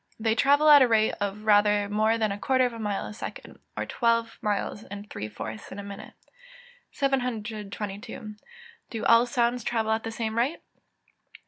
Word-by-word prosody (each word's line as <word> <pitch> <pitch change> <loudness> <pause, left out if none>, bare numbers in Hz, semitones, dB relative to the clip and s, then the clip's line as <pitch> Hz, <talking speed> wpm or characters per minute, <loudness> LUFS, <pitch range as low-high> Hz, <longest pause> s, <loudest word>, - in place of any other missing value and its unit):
_ - - -48 0.2
They 220 0 +2
travel 285 +5 +4
at 295 -2 +9
a 255 - +6
rate 220 -2 +3
of 205 +1 -3
rather 205 -1 +4
more 215 +2 +2
than 215 -2 0
a 200 - -4
quarter 260 +3 +2
of 245 - -2
a 230 - -8
mile 205 -2 -2
in - - -7
a - - -9
second, 210 - -8 0.2
or - - -2
twelve 230 -1 0
miles 210 0 -2
and 205 +1 -9
three 105 - -6
fourths 110 +1 -8
in - - -7
a 200 - -6
minute. 200 +1 -9 0.8
722. 215 -5 -3 0.5
_Do 225 -2 -4
all 230 +1 +6
sounds 240 -1 0
travel 225 -2 0
at 220 0 +1
the 225 - -5
same 225 0 -2
rate? 275 +8 0
220 Hz, 190 wpm, -27 LUFS, 205-235 Hz, 0.8 s, at